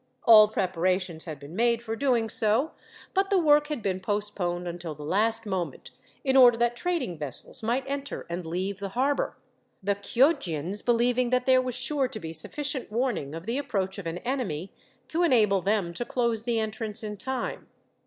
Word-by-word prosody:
All 215 -3 +9
preparations 185 -3 -1
had 155 -4 -6
been 145 +4 -10
made 235 +1 +2
for 225 -1 -3
doing 245 -3 +1
so, 220 +8 +2 0.4
but 390 -1 +1
the 400 - +3
work 295 -3 +4
had 295 -7 -4
been 190 -2 -1
postponed 185 -3 -1
until 170 -2 -5
the 150 - -9
last 220 +6 +1
moment, 190 -4 -4 0.3
in 265 -1 +1
order 245 -3 +8
that 240 0 +1
trading 265 - -2
vessels 150 - -4
might 240 +4 0
enter 280 +1 -4
and 175 +1 -4
leave 185 +4 -3
the 200 0 -4
harbour, 275 +2 +1 0.5
the 200 +1 +2
Chioggians 200 - +1
believing 245 +1 +2
that 250 0 +1
there 260 -1 +5
was 255 -2 -3
sure 265 +2 0
to 250 -4 -7
be 160 -4 -6
sufficient 265 - -4
warning, 220 - -1
of 165 +1 -7
the 235 +5 -1
approach 195 -8 -2
of 185 - -6
an 165 +1 -3
enemy, 195 - -3 0.3
to 330 - -1
enable 215 - +4
them 195 -3 0
to 240 - -3
close 235 -3 -1
the 235 -2 0
entrance 220 0 -3
in 210 -1 -4
time. 260 +5 -4
220 Hz, 185 wpm, -27 LUFS, 185-255 Hz, 0.5 s, All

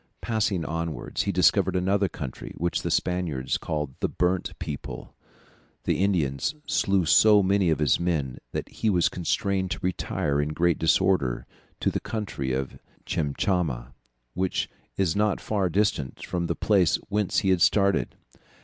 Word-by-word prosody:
Passing 105 -6 0
onwards 80 -1 -3
he - - 0
discovered - - +3
another 95 +2 +2
country, 70 -6 -7
which 85 +1 -1
the - - -3
Spaniards 85 -8 -1
called 75 -4 -3
the - - 0
burnt 90 +1 -1
people. 75 -3 -6 0.7
The 95 - +1
Indians 80 - 0
slew 95 -3 +1
so 105 +5 +6
many 95 -1 +2
of 80 - +2
his 75 -3 +2
men 80 -7 -1
that - - -3
he 110 - -1
was 90 -4 +3
constrained 95 +1 -1
to - - -3
retire 90 -5 0
in 75 +1 -2
great 85 +1 +2
disorder 80 -6 +2 0.4
to - - +2
the - - -1
country 100 -12 -4
of 65 +1 -3 0.3
Chinchama, 70 -5 -1 0.4
which 95 +1 -1 0.3
is 90 -5 +1
not 105 -1 +1
far 100 -4 0
distant 80 -8 -1
from 85 -1 -2
the - - -1
place 95 -7 +3
whence 105 -1 0
he - - +3
had 90 -2 +2
started. 100 +1 +3
90 Hz, 150 wpm, -26 LUFS, 75-100 Hz, 0.7 s, so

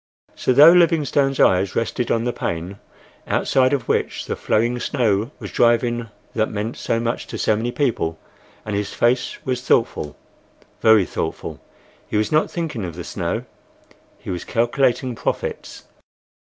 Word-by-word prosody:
So, - - 0
though 145 +6 +9
Livingstone's 150 -6 +3
eyes 95 +1 +3
rested 115 +1 -1
on 115 - +1
the 120 0 -1
pane, 90 +4 -4 0.5
outside 130 -1 +2
of 135 -5 -1
which - - -1
the - - -3
flurrying 120 +3 0
snow 115 -5 0
was - - -8
driving 120 -1 +2 0.2
that 110 -1 0
meant 110 +2 -4
so 115 - -1
much 115 +1 -2
to - - -6
so 110 - +2
many 115 +3 -2
people, 115 - -1 0.5
and 105 -2 -3
his 100 0 -3
face 120 +1 +1
was 125 -1 -1
thoughtful—very 110 - 0
thoughtful—he 105 - -6
was 105 - 0
not 155 +1 +3
thinking 160 - -4
of 85 -3 -5
the 90 - -6
snow, - - -3 0.7
he - - -7
was 90 - -4
calculating 125 +2 +1
profits. 115 - -4
120 Hz, 145 wpm, -21 LUFS, 105-130 Hz, 0.7 s, though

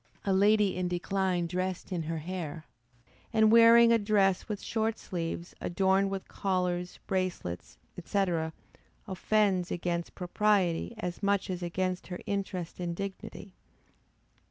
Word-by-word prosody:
A 195 - +2
lady 205 0 +4
in 180 0 -1
her - - -1
decline 180 0 0
dressed 185 +2 -3
in 175 -2 -1
her 165 +1 -3
hair, 160 -1 -5 0.7
and 220 -2 +4
wearing 230 0 +8
a 230 - +4
dress 200 -2 +2
with 210 -2 -3
short 225 0 -1
sleeves, 170 0 -5
adorned 190 +2 +2
with 195 -1 -5
collars, 180 -2 -2
bracelets, 140 - -3 0.3
&c. 200 +3 +1 0.8
offends 190 -1 +1
against 170 -1 -3
propriety 190 +1 +1
as 180 -5 -5
much 200 -1 +1
as 180 -1 -4
against 180 +1 -2
her 180 -1 -6
interest 190 -4 -3
and 175 -1 -3
dignity. 195 0 -7
185 Hz, 130 wpm, -30 LUFS, 175-200 Hz, 0.8 s, wearing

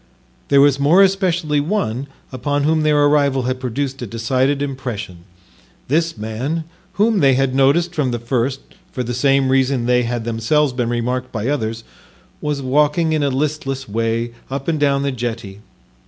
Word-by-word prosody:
There 140 -1 +5
was 140 -1 +4
more 160 +8 +5
especially 175 -6 +1
one 140 - -2 0.2
upon 145 +2 -1
whom 155 +1 +2
their 150 -1 +3
arrival 140 -3 +2
had 130 +1 -2
produced 135 +2 -3
a 120 - -4
decided 130 +6 0
impression. 120 -11 -5 0.6
This 165 0 +1
man, 120 +10 -3 0.3
whom 215 0 +2
they 135 -5 +4
had 135 0 +1
noticed 145 +6 +2
from 150 -6 0
the 120 - -2
first 125 +3 -1 0.3
for 125 - -3
the 120 0 -4
same 135 +1 +2
reason 130 -2 +2
they 125 0 +3
had 120 -1 -2
themselves 120 +5 +1
been 120 -2 -1
remarked 125 +2 -2
by 110 +2 -2
others, 115 -5 -2 0.6
was 145 -2 -2
walking 150 +4 +2
in 155 - +1
a 140 - +1
listless 135 -1 -2
way 115 +2 -1 0.2
up 135 0 -5
and 160 -2 0
down 140 -1 +2
the 140 - 0
jetty. 115 -5 -5
135 Hz, 170 wpm, -19 LUFS, 120-145 Hz, 0.6 s, There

